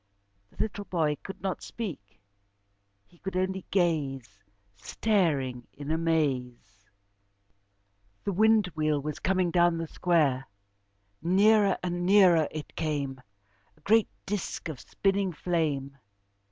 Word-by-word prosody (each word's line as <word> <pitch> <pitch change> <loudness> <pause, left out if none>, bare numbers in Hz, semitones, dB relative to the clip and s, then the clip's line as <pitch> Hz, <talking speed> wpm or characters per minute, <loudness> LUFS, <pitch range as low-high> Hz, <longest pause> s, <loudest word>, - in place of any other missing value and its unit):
The - - -26
little 205 -1 -3
boy 160 -6 0
could 195 - -9
not 190 -2 -2
speak, 160 - -7 0.9
he 175 - -25
could 190 -1 -4
only 190 0 -2
gaze, 140 - -1 0.3
staring 135 - 0
in 145 +1 -6
amaze. 130 -11 -1 1.3
The 200 - -1
wind 220 +2 +4
wheel 155 -2 +1
was 150 +1 -5
coming 185 -2 +1
down 175 -1 +3
the 165 0 -3
square. 150 -7 +1 0.7
Nearer 200 +4 +4
and 175 0 -2
nearer 180 -5 +5
it 155 -1 -8
came, 140 -4 -2 0.6
a - - -26
great 220 +5 +3 0.2
disk 195 -4 -4
of 145 -6 -6
spinning 195 -2 0
flame. 150 -6 -1
165 Hz, 115 wpm, -28 LUFS, 145-190 Hz, 1.3 s, nearer